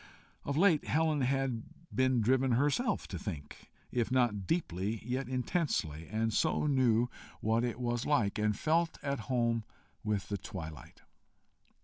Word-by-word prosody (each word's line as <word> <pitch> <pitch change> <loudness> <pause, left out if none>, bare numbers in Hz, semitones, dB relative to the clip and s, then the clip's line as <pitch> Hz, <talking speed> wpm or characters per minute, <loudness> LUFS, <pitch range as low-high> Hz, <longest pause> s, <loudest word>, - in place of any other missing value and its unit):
Of 140 0 -2
late 175 -4 +4
Helen 155 -1 +2
had 130 -2 0 0.3
been 130 -2 +3
driven 130 +3 +3
herself 145 - +1
to 90 -5 -4
think 75 -7 -7 0.2
if 120 -2 0
not 120 -7 +1
deeply, 105 - -1
yet 130 +2 -2
intensely 125 - -1
and 110 +2 0
so 160 +2 +2
knew 125 -5 +3 0.3
what 115 +2 +1
it 120 0 -2
was 120 -1 -1
like, 105 -8 +2
and 105 -1 +1
felt 165 +3 +1
at 140 -2 -1
home 115 -3 +1 0.4
with 105 -2 -1
the 100 -1 -2
twilight. 80 -9 -8
120 Hz, 140 wpm, -32 LUFS, 105-140 Hz, 0.4 s, late